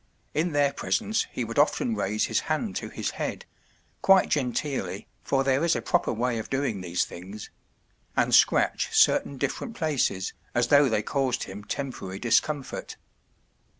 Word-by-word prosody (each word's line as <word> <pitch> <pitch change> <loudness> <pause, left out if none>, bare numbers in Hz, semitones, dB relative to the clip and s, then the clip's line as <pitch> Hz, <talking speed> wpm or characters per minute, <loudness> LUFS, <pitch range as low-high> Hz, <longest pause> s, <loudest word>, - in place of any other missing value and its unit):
In 165 +2 0
their 145 -1 +2
presence 220 +8 0
he 125 - -3
would 115 +3 -2
often 230 - +2
raise 105 - 0
his - - +1
hand - - -1
to - - -5
his - - -3
head—quite 195 -1 -1
genteelly, 135 0 -2 0.2
for 135 0 +1
there 135 +2 +2
is 170 -1 +3
a - - -1
proper 175 -1 +1
way 120 0 -1
of 110 - -7
doing 135 -7 -1
these 90 -1 0
things—and 95 +4 -6
scratch - - +4
certain 140 - +3
different 140 - -3
places, 140 - 0 0.2
as 120 0 +2
though 145 -1 +6
they 110 -2 0
caused 130 -2 0
him 100 +2 -8
temporary 105 -5 -5
discomfort. 135 +6 -1
135 Hz, 150 wpm, -26 LUFS, 110-150 Hz, 0.2 s, though